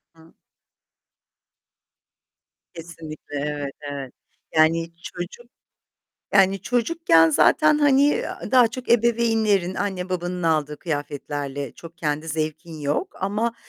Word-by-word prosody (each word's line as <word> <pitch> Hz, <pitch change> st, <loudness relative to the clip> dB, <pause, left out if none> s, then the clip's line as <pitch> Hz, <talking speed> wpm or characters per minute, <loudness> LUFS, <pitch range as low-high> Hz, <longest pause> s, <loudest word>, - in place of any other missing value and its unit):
Hı 160 Hz, 0 st, -20 dB, 2.4 s
Kesinlikle, 160 Hz, -3 st, -9 dB
evet, 145 Hz, -1 st, -3 dB, 0.2 s
evet. 135 Hz, -3 st, -6 dB, 0.4 s
Yani 165 Hz, +1 st, +3 dB
çocuk 175 Hz, +7 st, -7 dB, 0.9 s
yani 195 Hz, 0 st, +4 dB
çocukken 240 Hz, -, +3 dB
zaten, 300 Hz, -, +4 dB
hani, 280 Hz, -2 st, +4 dB
eee, 455 Hz, +12 st, +1 dB, 0.3 s
daha 250 Hz, -3 st, +6 dB
çok 250 Hz, +2 st, -8 dB
ebeveynlerin 225 Hz, -5 st, +2 dB
anne 190 Hz, -3 st, -3 dB
babanın 180 Hz, 0 st, -3 dB
aldığı 155 Hz, -2 st, 0 dB
kıyafetlerle, 145 Hz, -3 st, -4 dB
çok 165 Hz, 0 st, -13 dB
kendi 155 Hz, 0 st, -2 dB
zevkin 155 Hz, +1 st, -4 dB
yok 145 Hz, 0 st, -2 dB
ama 210 Hz, +5 st, -1 dB
170 Hz, 100 wpm, -23 LUFS, 150-220 Hz, 2.4 s, daha